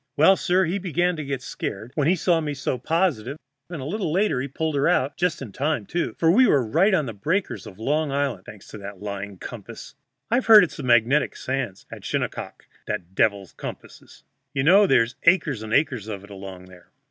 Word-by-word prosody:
"Well, 160 Hz, +6 st, +6 dB
sir, 185 Hz, 0 st, +2 dB
he 180 Hz, +4 st, -2 dB
began 175 Hz, -1 st, 0 dB
to 155 Hz, -, -4 dB
get 135 Hz, -2 st, -4 dB
scared 110 Hz, -1 st, -5 dB
when 145 Hz, -1 st, 0 dB
he 180 Hz, -, +4 dB
saw 170 Hz, -1 st, +2 dB
me 150 Hz, -2 st, -3 dB
so 130 Hz, -2 st, -2 dB
positive, 155 Hz, -, 0 dB, 0.3 s
and 165 Hz, -7 st, -6 dB
a -, -, -6 dB
little 185 Hz, +1 st, -2 dB
later 185 Hz, -7 st, +1 dB
he 135 Hz, -, -3 dB
pulled 160 Hz, +3 st, -3 dB
her 140 Hz, -1 st, +1 dB
out 135 Hz, +3 st, +1 dB
just 175 Hz, -5 st, -1 dB
in 115 Hz, -, -9 dB
time, 140 Hz, -1 st, -1 dB
too, 175 Hz, -, -2 dB
for 165 Hz, 0 st, +4 dB
we 250 Hz, +7 st, +5 dB
were 140 Hz, -, +3 dB
right 170 Hz, -, +3 dB
on 155 Hz, -, +1 dB
the 115 Hz, -, -5 dB
breakers 165 Hz, -, -2 dB
of 95 Hz, -, -12 dB
Long 145 Hz, +6 st, 0 dB
Island, 135 Hz, -8 st, -2 dB
thanks 105 Hz, -2 st, -12 dB
to 105 Hz, -, -9 dB
that 100 Hz, -1 st, -9 dB
lying 100 Hz, -1 st, -6 dB
compass. -, -, -9 dB, 0.4 s
I've 245 Hz, +2 st, +1 dB
heard 215 Hz, -2 st, +9 dB
it's 175 Hz, -, -4 dB
the -, -, -5 dB
magnetic 125 Hz, +3 st, +3 dB
sand 130 Hz, -8 st, -4 dB
at -, -, -9 dB
Shinnecock -, -, -4 dB, 0.2 s
that 90 Hz, +2 st, -4 dB
devils 100 Hz, -1 st, 0 dB
compasses. -, -, -10 dB, 0.3 s
You 135 Hz, -, +1 dB
know 195 Hz, +7 st, +6 dB
there's 125 Hz, -4 st, +2 dB
acres 165 Hz, -, +3 dB
and 110 Hz, 0 st, -7 dB
acres 130 Hz, -5 st, +1 dB
of 100 Hz, -3 st, -6 dB
it 100 Hz, -, -14 dB
along 95 Hz, -2 st, -9 dB
there." 90 Hz, -1 st, -17 dB
140 Hz, 215 wpm, -24 LUFS, 110-170 Hz, 0.4 s, heard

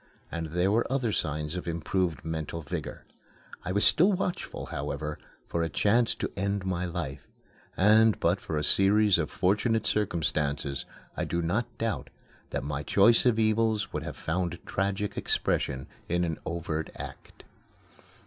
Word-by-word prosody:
And 85 Hz, -1 st, -3 dB
there 90 Hz, +4 st, +1 dB
were 115 Hz, +4 st, +1 dB
other 130 Hz, -5 st, +1 dB
signs 75 Hz, -2 st, -2 dB
of 90 Hz, -1 st, -5 dB
improved 85 Hz, -2 st, -1 dB
mental 80 Hz, 0 st, -4 dB
vigor. 70 Hz, -, -5 dB, 0.6 s
I 90 Hz, -, -3 dB
was 100 Hz, +2 st, +4 dB
still 185 Hz, +6 st, +6 dB
watchful, 180 Hz, -1 st, -3 dB
however, 75 Hz, +2 st, -4 dB, 0.3 s
for 85 Hz, -, -1 dB
a 80 Hz, -, 0 dB
chance 115 Hz, +8 st, +2 dB
to -, -, -3 dB
end 100 Hz, 0 st, -1 dB
my 90 Hz, -1 st, -1 dB
life, 85 Hz, -6 st, -5 dB, 0.5 s
and, 110 Hz, +3 st, +5 dB
but 90 Hz, +4 st, +2 dB
for 80 Hz, -, -3 dB
a 75 Hz, -, 0 dB
series 100 Hz, +3 st, +4 dB
of 80 Hz, -, -1 dB
fortunate 105 Hz, +5 st, +1 dB
circumstances, 75 Hz, -8 st, 0 dB, 0.3 s
I -, -, -1 dB
do 85 Hz, -, -1 dB
not 105 Hz, +9 st, 0 dB
doubt 115 Hz, -1 st, -2 dB, 0.4 s
that -, -, -3 dB
my 75 Hz, 0 st, -3 dB
choice 105 Hz, -, +5 dB
of 115 Hz, -3 st, +3 dB
evils 110 Hz, -2 st, +1 dB
would -, -, -2 dB
have -, -, -6 dB
found 85 Hz, +1 st, -2 dB
tragic 100 Hz, +1 st, -1 dB
expression 65 Hz, -1 st, 0 dB, 0.2 s
in 90 Hz, +1 st, +1 dB
an 80 Hz, -2 st, -2 dB
overt 80 Hz, -2 st, -3 dB
act. -, -, -10 dB
90 Hz, 155 wpm, -28 LUFS, 80-105 Hz, 0.6 s, still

